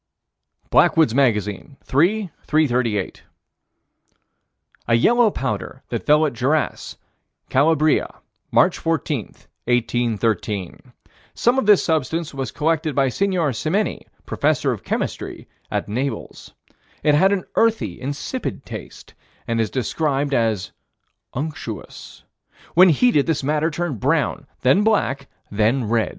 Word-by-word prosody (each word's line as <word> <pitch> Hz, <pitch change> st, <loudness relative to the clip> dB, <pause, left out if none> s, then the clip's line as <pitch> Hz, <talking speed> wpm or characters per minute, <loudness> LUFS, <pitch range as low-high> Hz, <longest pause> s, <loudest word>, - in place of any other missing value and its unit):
Blackwood's 160 Hz, -8 st, +4 dB
Magazine, 110 Hz, -1 st, 0 dB
3 180 Hz, +7 st, +1 dB, 0.2 s
338: 125 Hz, -10 st, 0 dB, 1.7 s
A 115 Hz, -, +4 dB
yellow 235 Hz, -, +4 dB
powder -, -, -4 dB
that -, -, -4 dB
fell 150 Hz, +1 st, +5 dB
at 150 Hz, -, -2 dB
Gerace, 140 Hz, +6 st, -1 dB, 0.5 s
Calabria, 155 Hz, +2 st, +3 dB, 0.4 s
March -, -, +3 dB
14, 155 Hz, -, -1 dB, 0.4 s
1813. 115 Hz, -5 st, -1 dB, 0.4 s
Some 245 Hz, +3 st, +2 dB
of 215 Hz, -, -2 dB
this 210 Hz, -2 st, +6 dB
substance 160 Hz, 0 st, -1 dB
was 135 Hz, -3 st, -3 dB
collected 155 Hz, -2 st, -1 dB
by 135 Hz, -1 st, +3 dB
Sig. 200 Hz, +10 st, 0 dB
Simenini, 165 Hz, -, -1 dB, 0.2 s
Professor -, -, +1 dB
of -, -, -5 dB
Chemistry, -, -, -4 dB, 0.2 s
at -, -, -2 dB
Naples. 130 Hz, +6 st, -4 dB, 0.5 s
It 150 Hz, -, +4 dB
had 190 Hz, +7 st, +4 dB
an 195 Hz, -3 st, 0 dB
earthy, 225 Hz, 0 st, +1 dB
insipid 145 Hz, -, -4 dB
taste, -, -, -10 dB, 0.3 s
and 115 Hz, -1 st, 0 dB
is 110 Hz, -, -1 dB
described 140 Hz, +2 st, -1 dB
as 110 Hz, -6 st, 0 dB, 0.6 s
"unctuous." 150 Hz, +4 st, -7 dB, 0.5 s
When 185 Hz, +3 st, +7 dB
heated, 160 Hz, -, +3 dB
this 160 Hz, -4 st, 0 dB
matter 150 Hz, +3 st, +1 dB
turned 160 Hz, -6 st, -3 dB
brown, 145 Hz, +1 st, 0 dB
then 135 Hz, +11 st, +4 dB
black, 140 Hz, -11 st, +1 dB, 0.2 s
then 110 Hz, +5 st, +1 dB
red. 115 Hz, 0 st, +1 dB
145 Hz, 115 wpm, -21 LUFS, 120-165 Hz, 1.7 s, When